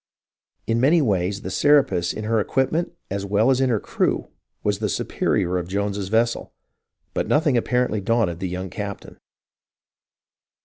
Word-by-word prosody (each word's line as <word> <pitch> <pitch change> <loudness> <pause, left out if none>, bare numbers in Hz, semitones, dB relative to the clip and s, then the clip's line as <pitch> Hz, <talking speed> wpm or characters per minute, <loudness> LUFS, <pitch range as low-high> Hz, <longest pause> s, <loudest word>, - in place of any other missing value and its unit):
In 115 +2 +1
many 155 +6 +5
ways 100 - 0
the 95 - -4
Serapis 135 -9 +3
in 110 - -6
her 110 +1 +1
equipment 135 +10 0 0.2
as 100 0 -2
well 105 +5 +2
as 130 0 +2
in 130 - +2
her 115 -3 +2
crew - - -1 0.3
was 105 -1 0
the 105 -1 -1
superior 90 0 0
of 85 - -5
Jones's 100 0 -2
vessel, 115 +2 0 0.6
but - - -1
nothing 150 -3 +2
apparently 125 -2 +1
daunted 100 -5 +1
the 95 -1 -3
young 90 0 -5
captain. 100 +1 -7
105 Hz, 150 wpm, -23 LUFS, 95-125 Hz, 0.6 s, many